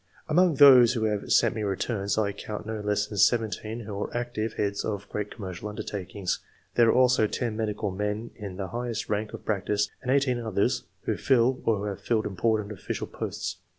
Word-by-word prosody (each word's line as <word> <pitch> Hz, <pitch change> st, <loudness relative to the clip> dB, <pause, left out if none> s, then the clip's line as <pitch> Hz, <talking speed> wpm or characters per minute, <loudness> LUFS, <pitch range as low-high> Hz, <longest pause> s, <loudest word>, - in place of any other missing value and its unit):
Among 170 Hz, +1 st, +4 dB
those 130 Hz, -4 st, +8 dB
who 115 Hz, -3 st, -1 dB
have 105 Hz, -2 st, -1 dB
sent -, -, +4 dB
me 110 Hz, -, -4 dB
returns, 100 Hz, +1 st, -1 dB
I 105 Hz, -2 st, +1 dB
count 105 Hz, +1 st, -6 dB
no 110 Hz, 0 st, -4 dB
less 105 Hz, 0 st, 0 dB
than 105 Hz, -1 st, -5 dB
seventeen 110 Hz, +1 st, +1 dB
who 105 Hz, -2 st, -5 dB
are -, -, -3 dB
active 115 Hz, -2 st, -2 dB
heads 100 Hz, -1 st, -1 dB
of 105 Hz, -1 st, -3 dB
great 105 Hz, 0 st, -3 dB
commercial 95 Hz, -1 st, -6 dB
undertakings. 100 Hz, -2 st, -4 dB, 0.3 s
There 120 Hz, -1 st, +5 dB
are -, -, +6 dB
also 125 Hz, -3 st, +4 dB
ten 115 Hz, 0 st, -2 dB
medical 105 Hz, -2 st, -2 dB
men 105 Hz, +4 st, -3 dB
in 100 Hz, -4 st, -7 dB
the 95 Hz, -2 st, -4 dB
highest 120 Hz, +1 st, -3 dB
rank 105 Hz, 0 st, -1 dB
of -, -, -12 dB
practice, 105 Hz, 0 st, 0 dB
and 125 Hz, -, -6 dB
eighteen 135 Hz, -2 st, +2 dB
others 115 Hz, +2 st, 0 dB, 0.2 s
who -, -, -1 dB
fill 130 Hz, 0 st, +2 dB
or 105 Hz, -2 st, +1 dB
have 100 Hz, -2 st, -5 dB
filled 110 Hz, -2 st, 0 dB
important 105 Hz, +1 st, 0 dB
official 100 Hz, -, -4 dB
posts. -, -, -5 dB
110 Hz, 190 wpm, -27 LUFS, 100-120 Hz, 0.3 s, those